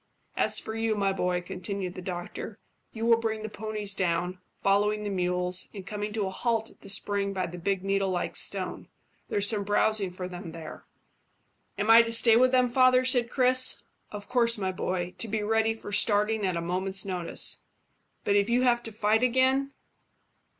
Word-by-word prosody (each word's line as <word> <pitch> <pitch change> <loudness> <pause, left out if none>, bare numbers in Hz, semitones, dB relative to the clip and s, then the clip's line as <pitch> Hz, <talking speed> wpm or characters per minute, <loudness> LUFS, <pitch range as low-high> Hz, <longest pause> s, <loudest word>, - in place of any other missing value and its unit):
"As - - +1
for 220 - -7
you, 225 -1 0
my 195 -1 0
boy," 180 -1 -1
continued 185 0 -5
the 185 - -8
doctor, 180 +4 -6 0.3
"you 225 0 -4
will 230 -1 +5
bring 220 -1 -3
the 220 - -4
ponies 210 -1 -3
down, 180 -1 -1 0.2
following 205 +2 +2
the 205 - -3
mules, 180 0 0
and 195 -2 -8
coming 210 0 -4
to 215 -2 -1
a 190 - -3
halt 225 +2 -1
at - - -24
that 200 - -12
spring 200 0 +1
by 185 -1 -1
the 175 +1 -8
big 190 +1 -1
needle 195 0 0
like 180 -1 -2
stone. - - 0 0.4
There's 205 0 +1
some 210 -2 0
browsing 205 0 +1
for 180 0 -6
them 175 -2 -8
there." 160 -2 -9 0.9
"Am 205 +3 +2
I 230 +1 +9
to 230 0 -3
stay 230 0 +4
with 255 +2 +5
them, 250 -1 +3
father?" 255 0 +4
said 245 -2 +3
Chris. 255 0 +3 0.3
"Of 205 -1 -8
course, 235 -2 +2
my 190 -2 -2
boy, 180 -1 -3
to 230 - 0
be 215 0 -2
ready 225 +1 +1
for 220 - -9
starting 210 0 +2
at 180 -2 -1
a - - -2
moment's 185 +3 0
notice." 180 -3 -2 0.6
"But 200 - +1
if 200 +2 +2
you 245 +2 +2
have 240 -1 +3
to 225 - -8
fight 215 +1 +1
again?" 260 +2 +2
205 Hz, 190 wpm, -27 LUFS, 185-225 Hz, 0.9 s, I